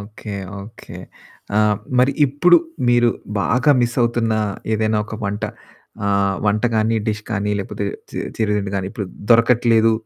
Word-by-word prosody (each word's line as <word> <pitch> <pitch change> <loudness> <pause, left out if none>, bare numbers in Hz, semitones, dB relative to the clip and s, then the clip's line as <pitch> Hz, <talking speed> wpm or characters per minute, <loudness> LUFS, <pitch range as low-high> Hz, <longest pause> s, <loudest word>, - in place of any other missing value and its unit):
Okay. 105 0 -8 0.3
Okay. 110 +3 -12 0.6
ఆ! - - +5 0.4
మరి 130 +2 +4
ఇప్పుడు 175 +6 +4 0.3
మీరు 120 -1 +4 0.3
బాగా 125 - +2
మిస్సవుతున్న 120 -1 +1 0.4
ఏదైనా 110 0 +1
ఒక 110 - -6
వంట 105 +2 -2 0.6
ఆహ్, 100 -1 +1
వంట 105 +1 +1
గాని 110 +1 +2
డిష్ 105 -1 -2
గాని, 105 -1 -1
లేకపోతే 100 +1 -4 0.3
చి - - -10 0.2
చిరు 110 -2 0
తిండి 100 -1 -2
గాని, 95 - -2
ఇప్పుడు 105 -3 -5 0.2
దొరకట్లేదు 115 -1 +4
110 Hz, 135 wpm, -20 LUFS, 105-120 Hz, 0.6 s, ఆ